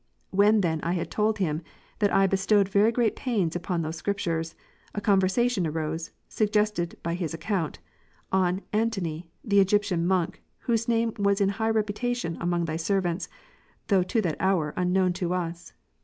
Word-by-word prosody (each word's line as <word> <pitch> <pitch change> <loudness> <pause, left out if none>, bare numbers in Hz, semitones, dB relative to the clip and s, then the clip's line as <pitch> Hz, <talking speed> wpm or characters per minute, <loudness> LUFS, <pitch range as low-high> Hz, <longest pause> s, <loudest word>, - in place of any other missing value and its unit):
When 205 +2 +4
then 160 -4 0
I 170 - -1
had 175 - -3
told 215 0 +1
him, 160 -5 -1 0.4
that 205 -2 +2
I 195 - +4
be 195 - +2
stowed 195 +1 +3
very 200 +3 +3
great 235 -2 +1
pains 200 -10 -1
upon 175 -1 -2
those 160 +1 -4
Scriptures, 165 -3 -2 0.4
a - - 0
conversation 200 +1 +2
arose 160 +1 -3 0.2
(suggested 210 -5 0
by 170 - -1
his 170 -2 -3
account) 165 -1 -2 0.5
on 185 0 +1
Antony'' 185 -7 -1
the 200 -3 +3
Egyptian 195 -3 +2
Monk: 185 -3 0 0.2
whose 230 -1 0
name 230 -1 +1
was 200 0 +2
in 200 -1 +3
high 220 +3 -1
reputation 220 -3 -1
among 175 0 0
Thy 160 0 -2
servants, 180 +1 -1 0.6
though 195 -3 +4
to 220 +5 0
that 165 -5 -1
hour 180 -6 +1
unknown 180 0 +2
to 180 0 -2
us. 170 -1 -4
190 Hz, 165 wpm, -26 LUFS, 170-210 Hz, 0.6 s, When